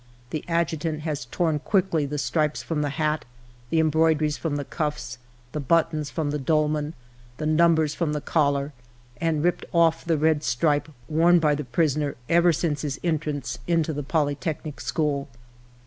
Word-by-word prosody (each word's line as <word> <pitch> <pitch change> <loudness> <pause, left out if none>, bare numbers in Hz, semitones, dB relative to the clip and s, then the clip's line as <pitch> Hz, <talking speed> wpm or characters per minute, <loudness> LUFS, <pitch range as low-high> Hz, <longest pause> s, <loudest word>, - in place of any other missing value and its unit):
The 155 - -3
adjutant 165 -2 -1
has 150 -5 -3
torn 160 +4 0
quickly 175 -4 +1
the 150 +1 -3
stripes 150 +3 0
from 160 -3 -2
the 145 - 0
hat, 150 +2 -1 0.5
the 165 - +1
embroideries 155 -1 +3
from 155 -2 -2
the 145 -1 -3
cuffs, 150 -8 -3 0.3
the 150 - -3
buttons 155 +1 +1
from 155 -3 -2
the 150 - -2
dolman, 150 +1 0 0.4
the 155 - -3
num 165 +2 +4
bers 155 -2 +1
from 160 -3 -1
the 150 - -1
collar, 145 -2 +1 0.4
and 160 -1 0
ripped 175 0 +1
off 165 -1 +3
the 165 -2 +1
red 155 0 +2
stripe 145 +4 +1 0.2
worn 170 +3 +4
by 155 -3 +3
the 150 +1 -2
prisoner 145 +2 0
ever 170 +1 +5
since 155 -3 -1
his 145 -2 -3
entrance 150 -7 -2
into 165 -2 +1
the 145 - -3
Poly 145 0 +1
technic 155 -1 -5
School. 145 -3 -1
155 Hz, 170 wpm, -25 LUFS, 145-165 Hz, 0.5 s, ever